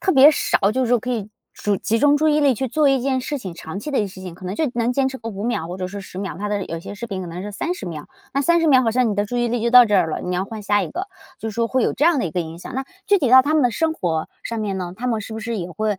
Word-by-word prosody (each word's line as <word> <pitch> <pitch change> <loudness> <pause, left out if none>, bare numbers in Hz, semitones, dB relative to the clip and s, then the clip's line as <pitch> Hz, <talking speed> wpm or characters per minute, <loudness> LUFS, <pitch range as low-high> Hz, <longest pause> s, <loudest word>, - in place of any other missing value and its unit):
特 380 - +1
别 275 +1 +8
少 210 -8 +1
就 260 +2 0
是 - - -2
说 245 -1 +4
可 250 +3 -5
以 215 -4 -2 0.2
注 205 -1 -1
集 225 +4 0
中 290 +2 +4
注 310 +1 +2
意 300 0 +3
力 280 -3 +4
去 265 +4 -2
做 295 +3 +3
一 270 -1 +3
件 260 -1 0
事 290 +3 -3
情， 195 -10 -6
长 165 +2 -7
期 300 - -5
的 275 - 0
一 - - +3
些 - - -7
事 185 - -10
情 180 -3 -7
可 185 +1 -10
能 185 - -3
就 315 - 0
能 235 0 +1
坚 270 0 +1
持 265 0 -7
个 230 -1 -6
5 200 -1 -5
秒 225 -9 -1
或 180 - -5
者 185 -1 -3
是 200 +1 -7
10 185 - -12
秒， 195 0 -4
它 205 +1 -3
的 205 -2 -1
有 165 - -5
些 185 - -8
视 225 +4 -6
频 195 -3 -4
可 180 - -6
能 175 +2 -6
是 210 - -5
30 345 - -3
秒。 160 -4 -7 0.2
那 275 - +1
30 335 +3 +3
秒 260 -3 +6
好 225 - +2
像 245 -1 +2
你 - - -1
的 205 +1 0
注 245 - -4
意 240 0 +1
力 240 0 -1
就 235 - +1
到 250 -1 +9
这 210 - 0
儿 175 -3 +3
了， 155 - -3
你 180 0 -2
要 185 - 0
换 215 0 -7
下 205 0 +2
一 - - -4
个， 375 +3 -5 0.3
就 225 - -4
是 215 - -10
说 230 0 +1
会 260 -2 +1
有 - - +1
这 295 - +2
样 335 -5 +4
的 - - 0
一 170 - -2
个 175 +3 -1
影 165 0 -6
响。 180 - -9
那 265 +1 -2 0.2
具 405 -1 +4
体 275 - +1
到 260 +2 +8
他 290 - 0
们 305 - +4
的 245 - +3
生 320 +8 0
活 165 - -2 0.2
上 230 - -3
面 200 -3 -2
呢， 180 -1 -5
他 250 +4 -4
们 225 -3 0
是 220 +2 -7
不 220 - -5
是 230 0 -3
也 175 -1 -5
会 210 +2 -2
225 Hz, 375 characters per minute, -21 LUFS, 195-265 Hz, 0.3 s, 到